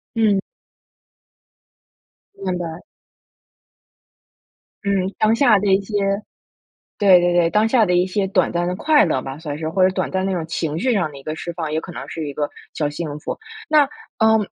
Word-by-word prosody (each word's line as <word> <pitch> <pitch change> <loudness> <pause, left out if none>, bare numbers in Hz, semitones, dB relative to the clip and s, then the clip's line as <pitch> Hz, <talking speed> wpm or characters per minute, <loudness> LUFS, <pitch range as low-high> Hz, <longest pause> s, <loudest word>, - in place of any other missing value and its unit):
嗯。 215 -3 +3 2.0
明 185 -2 -3
白。 170 -1 -5 2.1
嗯， 195 -1 +1
当 215 +1 +3
下 230 -6 +5
的 200 - -1
一 195 - +3
些 200 - -12 1.1
对 190 -3 +7
对 175 0 +2
对。 175 -1 +3
当 210 +3 +3
下 235 -2 +4
的 180 - +1
一 180 +1 +3
些 195 +1 -1
短 190 -2 +1
暂 175 0 0
的 180 - -2
快 300 +4 +4
乐 130 -5 0
吧， 135 +1 -7
算 150 -2 -5
是， 160 0 -3
或 185 +3 +1
者 - - +2
短 - - -1
暂 190 0 -1
的 195 - 0
那 185 - -1
种 160 - -3
情 160 -1 -2
绪 255 +7 +1
上 180 -8 0
的 140 - -12
一 135 - -11
个 155 +2 -4
释 170 +2 -6
放， 160 -3 -4
也 160 - 0
可 180 - -9
能 - - -7
是 160 -2 -5
一 140 - -7
个 145 0 -1 0.3
小 150 - 0
幸 150 -1 -5
福。 - - -4 0.3
那， 305 -2 +6 0.3
呃， 220 0 +5
180 Hz, 210 characters per minute, -21 LUFS, 160-200 Hz, 2.1 s, 对